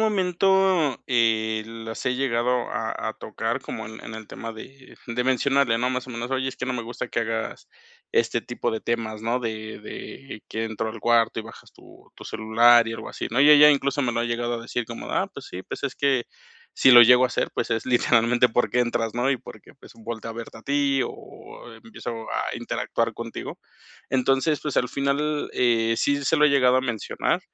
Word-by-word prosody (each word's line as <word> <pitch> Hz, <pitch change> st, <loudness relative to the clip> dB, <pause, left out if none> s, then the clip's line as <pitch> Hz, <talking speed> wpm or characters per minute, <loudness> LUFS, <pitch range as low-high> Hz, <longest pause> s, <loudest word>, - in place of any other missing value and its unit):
momento, 190 Hz, -, +2 dB
eh, 110 Hz, -3 st, +1 dB
las 115 Hz, +2 st, -8 dB
he 125 Hz, -, +1 dB
llegado 125 Hz, -1 st, 0 dB
a -, -, -2 dB, 0.2 s
a -, -, -8 dB
tocar -, -, -4 dB
como -, -, -6 dB
en 110 Hz, +1 st, -10 dB
en 110 Hz, -, -8 dB
el 110 Hz, -1 st, -8 dB
tema 115 Hz, 0 st, -7 dB
de 130 Hz, +4 st, -13 dB
de 125 Hz, +1 st, -2 dB
mencionarle, 130 Hz, -2 st, +2 dB
¿no?, 125 Hz, +1 st, 0 dB
más 130 Hz, 0 st, -3 dB
o -, -, -7 dB
menos: 120 Hz, +1 st, -5 dB
"Oye, 130 Hz, 0 st, 0 dB
es 135 Hz, -, -7 dB
que 125 Hz, -, -4 dB
no 130 Hz, -, -1 dB
me 120 Hz, -2 st, -3 dB
gusta 120 Hz, +1 st, -6 dB
que -, -, -2 dB
hagas 115 Hz, 0 st, -4 dB, 0.4 s
este 115 Hz, 0 st, +1 dB
tipo 120 Hz, 0 st, -3 dB
de 110 Hz, -, -3 dB
temas, 110 Hz, -2 st, -3 dB
¿no?, 115 Hz, +2 st, 0 dB
de 110 Hz, -2 st, -5 dB
de 110 Hz, +2 st, -9 dB
que 110 Hz, +1 st, -3 dB
entro 110 Hz, 0 st, -3 dB
al 110 Hz, +1 st, -7 dB
cuarto 115 Hz, 0 st, +2 dB
y 110 Hz, -, -3 dB
bajas 115 Hz, -, -14 dB
tu -, -, -19 dB
tu -, -, -11 dB
celular 115 Hz, +1 st, +4 dB
y 115 Hz, -, -4 dB
algo -, -, -7 dB
así", -, -, -5 dB
¿no?, 120 Hz, +4 st, +1 dB
y 145 Hz, -, +7 dB
ella 150 Hz, 0 st, +9 dB
incluso 140 Hz, 0 st, +1 dB
me 120 Hz, -, 0 dB
lo 115 Hz, 0 st, -1 dB
ha -, -, 0 dB
llegado 120 Hz, 0 st, -2 dB
a 115 Hz, -, -5 dB
decir 120 Hz, 0 st, -3 dB
como: 115 Hz, +1 st, -8 dB
"Ah, -, -, 0 dB
pues -, -, -10 dB
sí, 95 Hz, -, -8 dB
pues -, -, -7 dB
es 135 Hz, -, -3 dB
que 135 Hz, -4 st, +1 dB, 0.5 s
si 130 Hz, -, +5 dB
lo 120 Hz, -1 st, +11 dB
llego 125 Hz, +2 st, +7 dB
a -, -, +5 dB
hacer, -, -, -1 dB
pues -, -, -2 dB
es 115 Hz, +2 st, -1 dB
literalmente 120 Hz, 0 st, +3 dB
porque 120 Hz, +1 st, +1 dB
entras, 115 Hz, -2 st, -1 dB
¿no?, 125 Hz, +3 st, +1 dB
y 130 Hz, -, +2 dB
porque, -, -, -13 dB
pues, -, -, -15 dB
volteo 115 Hz, 0 st, -7 dB
a -, -, -13 dB
verte 115 Hz, -1 st, -8 dB
a -, -, -15 dB
ti 140 Hz, -1 st, +1 dB
o 120 Hz, -, -12 dB
empiezo 115 Hz, 0 st, -7 dB
a -, -, -2 dB
interactuar 115 Hz, -1 st, -2 dB
contigo". 115 Hz, -1 st, -7 dB, 0.5 s
Entonces, 135 Hz, +4 st, +1 dB
pues 150 Hz, -, -4 dB
al 125 Hz, -, +2 dB
final, 140 Hz, +3 st, -1 dB
eh, 115 Hz, -2 st, +2 dB
sí 140 Hz, +2 st, 0 dB
se 160 Hz, -, +2 dB
lo 150 Hz, -, +5 dB
he 150 Hz, -, +6 dB
llegado 130 Hz, -3 st, +4 dB
a -, -, +3 dB
mencionar, 120 Hz, -4 st, -1 dB
120 Hz, 220 wpm, -24 LUFS, 115-135 Hz, 0.5 s, lo